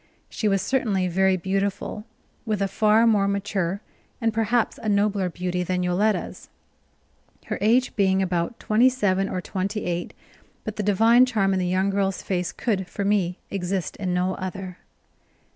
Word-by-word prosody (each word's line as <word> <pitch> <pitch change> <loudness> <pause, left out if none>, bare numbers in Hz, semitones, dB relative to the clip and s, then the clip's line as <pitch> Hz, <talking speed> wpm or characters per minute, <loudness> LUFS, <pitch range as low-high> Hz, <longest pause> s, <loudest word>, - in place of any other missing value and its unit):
She 215 - -1
was 195 -2 +1
certainly 205 -6 0
very 190 +1 +2
beautiful, 195 +3 -2 0.4
with 215 -3 -1
a 195 - +1
far 215 +3 +3
more 210 -3 +3
mature 200 -1 -1 0.4
and 225 -2 0
perhaps 225 +1 0
a 220 - -3
nobler 200 -2 +1
beauty 180 +1 -3
than 180 0 -1
Yoletta's, 195 +5 -1 1.0
her - - -4
age 240 +5 +2
being 190 -2 +2
about 180 +2 -1
twenty 230 +4 +4
seven 195 -6 0
or 185 - -3
twenty 195 +4 -3
eight; 175 0 -3 0.5
but 215 - -5
the - - -2
divine 225 +5 +5
charm 200 -5 +1
in 190 - +1
the 180 - 0
young 190 +2 +1
girl's 195 -1 -1
face 180 -2 -2
could, 195 -6 -2
for 200 - -4
me, 195 -3 +1
exist 190 -1 -2
in 185 -3 -2
no 180 +1 0
other. 185 0 -6
195 Hz, 160 wpm, -24 LUFS, 185-215 Hz, 1.0 s, divine